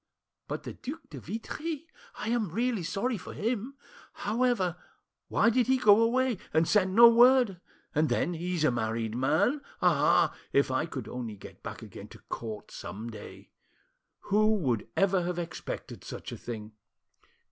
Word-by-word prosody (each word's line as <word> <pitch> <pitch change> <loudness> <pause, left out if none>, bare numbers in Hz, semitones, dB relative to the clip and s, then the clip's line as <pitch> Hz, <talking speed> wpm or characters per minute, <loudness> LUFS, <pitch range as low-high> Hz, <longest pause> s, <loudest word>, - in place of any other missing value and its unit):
But - - -4
the - - -6
Duc 280 +6 -7
de 140 - -7
Vitry? 300 - -5 0.3
I 215 - -3
am 230 -5 0
really 230 +3 0
sorry 200 +7 -1
for 160 - -9
him. 235 +4 -2 0.4
However, 220 -5 0 0.5
why 230 - +3
did 245 +1 +2
he 260 0 +4
go 215 -3 +6
away, 245 -1 +2 0.2
and 160 +1 +4
send 190 -2 +2
no 235 +1 +10
word? 240 -5 +5 0.3
And 155 +1 +2
then, 175 - +1
he's 175 0 -2
a 155 - +4
married 115 -1 -2
man. 155 - +2 0.2
Ah! 155 -4 +4 0.2
if 140 -1 +3
I 130 +5 0
could 130 -8 -6
only 120 -4 -5
get 95 - -13
back - - -7
again - - -10
to - - -13
court 110 -2 -6
some 110 +4 -7
day!... 110 - -11 0.7
Who 215 +2 +3
would 130 - -1
ever 195 -1 +3
have 175 0 -2
expected 170 -1 -6
such - - -7
a - - -6
thing? 110 -2 -7
185 Hz, 160 wpm, -29 LUFS, 140-235 Hz, 0.7 s, no